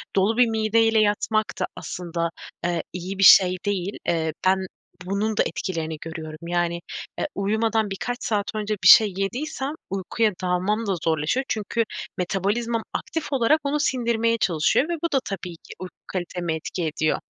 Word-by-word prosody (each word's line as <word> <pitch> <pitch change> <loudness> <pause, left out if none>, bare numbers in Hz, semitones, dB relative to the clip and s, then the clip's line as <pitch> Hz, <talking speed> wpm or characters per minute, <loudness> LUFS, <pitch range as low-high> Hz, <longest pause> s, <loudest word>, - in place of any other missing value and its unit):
dolu 205 +4 +2
bir 245 -1 +6
mideyle 225 0 +3
yatmak 215 +1 +1
da - - +1
aslında, 170 -2 -3 0.4
eee, 175 -1 0
iyi 180 +2 -5
bir 195 - +3
şey 185 -1 +8
değil. 200 -1 -2
Eee, 160 -2 0
ben 190 - +5 0.5
bunun 205 +3 -1
da - - +5
etkilerini 160 -4 -3
görüyorum. 160 0 -7
Yani, 175 0 0 0.4
e, - - 0
uyumadan 220 +2 +1
birkaç 245 +5 -3
saat 205 -2 -1
önce 215 0 -1
bir - - +6
şey 215 -4 +9
yediysem, 265 +7 -2 0.2
uykuya 195 +3 0
dalmam 185 +5 0
da 195 - +1
zorlaşıyor. 160 - +1
Çünkü 220 +2 0 0.3
metabolizmam 210 +6 -1
aktif 320 -3 -3
olarak 270 +4 +3
onu 290 +1 0
sindirmeye 230 -4 +1
çalışıyor 175 - +2
ve - - 0
bu 335 - 0
da 270 - +4
tabii 180 -3 -5
ki - - -12
uyku 185 0 -8
kaliteme 175 -2 -3
etki 170 +2 -4
ediyor. 155 0 0
200 Hz, 160 wpm, -24 LUFS, 175-225 Hz, 0.5 s, şey